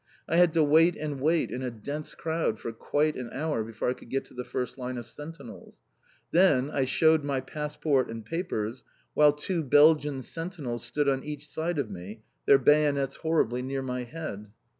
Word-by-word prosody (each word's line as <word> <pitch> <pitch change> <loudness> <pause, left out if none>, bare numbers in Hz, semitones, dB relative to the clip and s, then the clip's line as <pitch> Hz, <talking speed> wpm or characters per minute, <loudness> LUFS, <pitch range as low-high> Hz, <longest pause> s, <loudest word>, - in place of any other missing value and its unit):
I 165 - +1
had 175 -1 +6
to 160 - +5
wait 160 +3 +5
and 145 -3 -4
wait 160 +3 +2
in 125 - -4
a 130 - -2
dense 140 +7 -6
crowd 160 -9 -1
for 115 - -5
quite 150 +6 0
an 125 -2 -5
hour 150 -5 -1
before 110 0 -4
I 125 - +2
could - - -15
get 135 - -1
to - - -18
the 125 - -5
first 125 +1 -4
line 125 0 -4
of 120 - -6
Sentinels. 150 -3 -10 0.5
Then 150 -6 +4
I 135 -3 +1
shewed 160 +3 +3
my 140 -2 -1
passport 150 0 -1
and 115 -1 -7
papers, 120 - -3 0.3
while 150 -1 +6
two 165 +4 -2
Belgian 145 -1 +4
sentinels 150 -8 -5
stood 140 +5 -1
on 135 -1 +1
each 150 0 -6
side 165 +1 -2
of 130 -7 -2
me, 100 +4 -9 0.2
their 140 - +8
bayonets 140 -1 +3
horribly 150 -7 +1
near 135 +1 -3
my 125 -1 -3
head. 120 -7 -7
140 Hz, 190 wpm, -28 LUFS, 125-155 Hz, 0.5 s, their